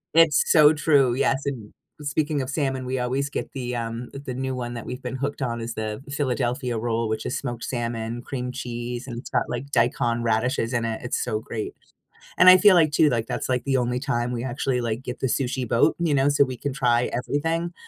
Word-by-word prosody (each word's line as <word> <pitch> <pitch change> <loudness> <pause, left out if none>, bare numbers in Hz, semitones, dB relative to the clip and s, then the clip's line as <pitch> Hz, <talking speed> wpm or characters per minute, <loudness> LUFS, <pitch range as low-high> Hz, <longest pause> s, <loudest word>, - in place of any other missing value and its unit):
It's 165 -3 +6
so 155 -1 +7
true, 140 -5 +3
yes, 135 +1 +1
and 120 -7 -4 0.3
speaking 150 0 -1
of 130 - -4
salmon, 135 -3 -1
we 130 +1 -2
always 130 +3 -1
get - - -4
the, 125 -2 -4
um 115 +1 -4
uh, - - -5
the 130 - -4
new 130 0 -3
one 120 -1 -4
that 115 - -6
we've 125 +1 -6
been 130 - -4
hooked 140 +1 -3
on 120 -2 -2
is 115 0 -4
the 110 +2 -4
Philadelphia 125 -3 -1
roll, 115 0 -1
which 110 0 -2
is 125 - -2
smoked 120 -3 -5
salmon, 115 -1 -3
cream 125 -2 -4
cheese, 120 -1 -5
and 120 -3 -6
it's - - -9
got, 125 -2 +1
like, 125 +3 -4
daikon 120 -1 +1
radishes 115 +2 0
in 120 - 0
it, 110 -1 -2
it's 125 - -1
so 110 - -1
great. 110 0 -5 0.6
And 185 - +6
I 185 - +11
feel 205 -1 +6
like 155 -3 +4
too, 150 -1 +5
like, 115 -2 -1
that's, 125 +1 -3
like, 125 -1 0
the 135 -1 +1
only 125 0 0
time 120 0 -1
we 120 0 -3
actually, 130 0 -1
like, 115 +1 -2
get 125 0 -6
the 130 - 0
sushi 130 0 -1
boat, 115 +1 +3
you 165 -4 +1
know, 140 +1 +3
so 140 -1 +4
we 130 - -5
can 140 -1 -3
try 125 -2 +2
everything, 165 +7 -1
125 Hz, 230 wpm, -24 LUFS, 120-140 Hz, 0.6 s, I